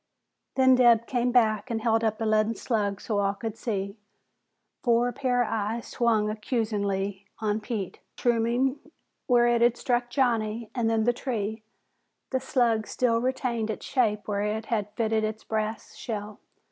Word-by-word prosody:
Then 260 -1 +6
Dabb 240 -2 +5
came 245 0 0
back 220 -2 +2
and 230 -1 -1
held 225 0 +1
up 220 -1 +1
the 225 - -2
leaden 215 +1 +2
slug 205 -5 -1
so 210 -3 -1
all 200 0 +1
could 220 +1 -5
see. 200 -2 -3 0.8
Four 240 0 +3
pairs 245 -2 +1
of - - -3
eyes 225 +2 -2
swung 225 -3 +2
accusingly 205 -3 -2
on 215 0 -1
Pete. 210 -4 -4 0.2
Mushrooming 240 +3 +1 0.5
where 240 -2 +5
it 240 -1 +3
had 240 0 +4
struck 240 -1 0
Johnny 230 -4 0
and 235 -3 0
then 225 -1 +2
the 240 +2 +3
tree, 220 -4 -3 0.7
the 260 - +1
slug 240 -4 +1
still 230 -2 +1
retained 250 -3 -1
its 220 - -4
shape 215 -6 0
where 200 -1 -1
it 215 +1 -2
had 210 -3 -2
fitted 220 -1 +1
its 215 0 -3
brass 220 0 -3
shell. 210 -2 -6
225 Hz, 160 wpm, -27 LUFS, 215-240 Hz, 0.8 s, Then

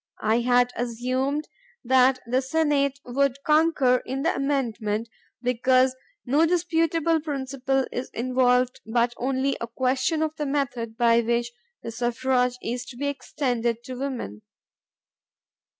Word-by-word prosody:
I 220 +2 +3
had 245 0 +3
assumed 255 +5 -2 0.4
that 255 +1 +4
the 250 +3 +1
Senate 280 -1 +1
would 270 +1 +1
concur 305 -5 +4
in 265 +2 -4
the 330 - +2
amendment 235 -6 -1 0.4
because 255 +1 +3 0.3
ho 295 +6 +4
disputable 330 -1 +1
principle 270 -2 -1
is 250 - -4
involved 250 +1 +1
but 235 0 +2
only 265 +2 0
a 235 - -3
question 260 +6 0
of 310 0 -2
the 295 - -2
method 245 -5 -2
by 235 -1 +4
which 235 +1 -1 0.3
the 230 - -5
suffrage 250 +1 0
is 245 +2 -3
to 245 - -11
be 285 - -3
extended 240 -4 -2
to 255 - -7
women. 250 - -5
255 Hz, 130 wpm, -25 LUFS, 240-280 Hz, 0.4 s, that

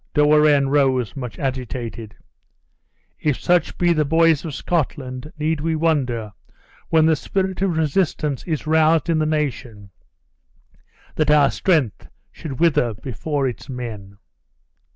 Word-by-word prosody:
De 150 - +4
Warenne 150 -2 +4
rose, 135 -4 +1
much 125 -6 -6
agitated: 120 -4 -5 1.0
"If 150 -4 0
such 175 -2 +1
be 175 -1 +3
the 155 -2 +1
boys 160 0 +3
of 155 -4 -5
Scotland 140 -4 -3
need 155 0 -1
we 160 +1 0
wonder, 130 -9 0 0.6
when 160 -1 +4
the 160 0 +4
spirit 190 +5 -2
of 185 -4 0
resistance 155 -3 0
is 160 -4 -3
roused 160 +1 +3
in 160 - +1
the 155 - +1
nation, 125 -9 -3 1.3
that 155 -1 +1
our 150 -2 +5
strength 155 - 0 0.2
should 140 -4 -8
wither 140 -9 +2
before 135 +5 -3
its 125 - -7
men?" 110 -6 -7
150 Hz, 130 wpm, -21 LUFS, 125-160 Hz, 1.3 s, our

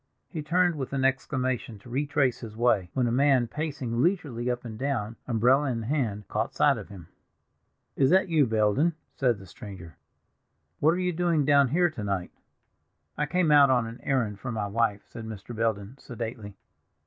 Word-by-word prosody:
He 160 - -5
turned 175 +2 +2
with 135 -1 -5
an 135 -1 +1
exclamation 130 -3 -1
to 100 - -17
retrace 140 -1 +1
his 110 -2 -9
way, 110 -7 +2
when 130 -2 +2
a 120 - 0
man 135 0 +3
pacing 135 -4 -3
leisurely 140 -9 0
up 125 0 -3
and 110 -2 -6
down, 120 -4 -2
umbrella 130 +4 +3
in 115 -3 -2
hand, 110 -6 -2
caught - - -2
sight - - +3
of - - -10
him. 90 -5 -11 0.9
"Is 135 -1 +3
that 190 +3 +4
you, 155 -6 +3
Belden?" 110 +9 +2 0.2
said 125 -4 +1
the 95 - -12
stranger. 90 -4 -11 0.8
"What 160 +3 +4
are - - -2
you 180 -1 0
doing 165 -3 +1
down 140 -1 +5
here 175 +6 +2
to 115 -9 -6
night?" 95 -3 -2 0.8
"I 150 - -1
came 175 -1 +2
out 145 -2 +7
on 125 -3 +3
an 115 +2 -8
errand 115 -7 -1
for 125 - -5
my 110 -3 -2
wife," 105 0 0
said 115 - -9
Mr. 110 +2 -8
Belden 110 +1 -2
sedately. 115 -4 -7
125 Hz, 185 wpm, -27 LUFS, 110-145 Hz, 0.9 s, out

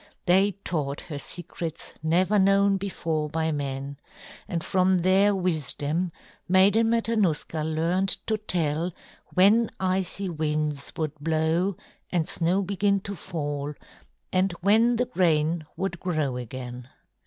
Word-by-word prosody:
They 195 +3 +4
taught 145 -4 -2
her 150 -4 -7
secrets 165 +1 -6
never 180 +6 +2
known 195 +1 +4
before 165 -6 -2
by 160 +1 -1
men, 140 -1 -4 0.5
and 170 -2 -3
from 185 0 +2
their 190 +3 +3
wisdom 165 -1 +1 0.4
Maiden 200 +5 +5
Matanuska 215 -9 0
learned 165 +5 0 0.2
to 220 -1 -1
tell 170 -3 0 0.4
when 205 +5 +5
icy 190 +1 -1
winds 150 -3 -2
would 155 -2 -2
blow 160 +4 0 0.3
and 170 -3 0
snow 180 +4 +1
begin 200 +1 +1
to 200 +1 -6
fall 145 -4 -4 0.6
and 185 0 +2
when 225 +5 +4
the 250 +2 +1
grain 165 -4 +1
would 190 -3 -3
grow 155 -8 -1
again. 125 0 -7
175 Hz, 120 wpm, -26 LUFS, 155-195 Hz, 0.6 s, Maiden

